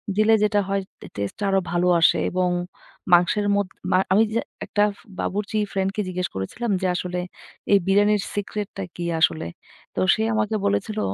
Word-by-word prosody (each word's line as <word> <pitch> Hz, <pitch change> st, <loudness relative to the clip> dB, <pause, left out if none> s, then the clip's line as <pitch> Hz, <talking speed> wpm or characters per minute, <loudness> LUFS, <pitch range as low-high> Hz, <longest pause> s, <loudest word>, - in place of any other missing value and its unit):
দিলে 215 Hz, +1 st, +4 dB
যেটা 205 Hz, 0 st, +3 dB
হয় 195 Hz, 0 st, 0 dB, 0.2 s
টে -, -, -9 dB
টেস্টটা 100 Hz, -, -4 dB
আরো 195 Hz, 0 st, +3 dB
ভালো 175 Hz, +1 st, +1 dB
আসে 165 Hz, -, +4 dB
এবং 180 Hz, 0 st, +1 dB, 0.6 s
মাংসের 180 Hz, +4 st, +4 dB
মধ 200 Hz, -2 st, +1 dB, 0.2 s
মা 185 Hz, -, +5 dB, 0.2 s
আমি 215 Hz, +3 st, +5 dB
যে 230 Hz, -, +2 dB, 0.3 s
একটা 205 Hz, -, +1 dB, 0.4 s
বাবুর্চি 210 Hz, +2 st, -2 dB
ফ্রেন্ডকে 195 Hz, +2 st, -1 dB
জিজ্ঞেস 180 Hz, -1 st, -2 dB
করেছিলাম 210 Hz, -, -3 dB
যে, 185 Hz, -, +1 dB
"আসলে 180 Hz, 0 st, -3 dB, 0.5 s
এই 200 Hz, -, +8 dB
বিরিয়ানির 205 Hz, +1 st, +4 dB
সিক্রেটটা 205 Hz, -1 st, -4 dB
কি 175 Hz, -, -4 dB
আসলে?" 85 Hz, -, +2 dB, 0.5 s
তো -, -, -2 dB
সে 220 Hz, -, -1 dB
আমাকে 215 Hz, 0 st, 0 dB
বলেছিল, 100 Hz, -, 0 dB
195 Hz, 160 wpm, -23 LUFS, 180-210 Hz, 0.6 s, এই